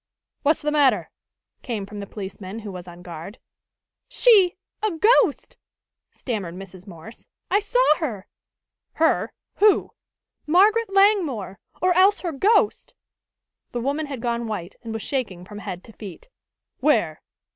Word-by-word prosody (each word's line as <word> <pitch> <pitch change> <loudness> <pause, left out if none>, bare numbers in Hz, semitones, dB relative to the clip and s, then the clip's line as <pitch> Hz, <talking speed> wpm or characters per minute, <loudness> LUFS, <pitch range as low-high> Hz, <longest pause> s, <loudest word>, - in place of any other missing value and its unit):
"What's 295 +2 +1
the 300 - 0
matter?" 290 -3 +2 0.5
came 220 -6 -4
from 205 +1 -9
the 200 - -6
policeman 195 0 -7
who 215 -3 -7
was 180 -1 -9
on 175 0 -12
guard. 170 +5 -9 0.7
"She 405 -8 +5 0.3
a 430 - +1
ghost!" 420 +9 +2 0.5
stammered 200 -9 -5
Mrs. 190 0 -11
Morse. 175 +4 -12 0.2
"I 400 - +4
saw 420 -6 +3
her!" 225 - -4 0.7
"Her? 320 0 +1 0.3
Who?" 420 -1 +4 0.6
"Margaret 410 +6 +4
Langmore! 350 - +2 0.2
Or 365 0 +4
else 385 +3 +4
her 345 - -2
ghost!" 415 - +1 0.8
The 240 - -2
woman 285 +5 -2
had 270 -4 -7
gone 235 -1 -1
white, 190 -4 -5
and 230 - -7
was 225 -2 -4
shaking 205 -10 -3
from 205 +1 -9
head 185 -3 -7
to 225 - -15
feet. 220 - -11 0.5
"Where?" 220 - +1
240 Hz, 140 wpm, -23 LUFS, -, 0.8 s, She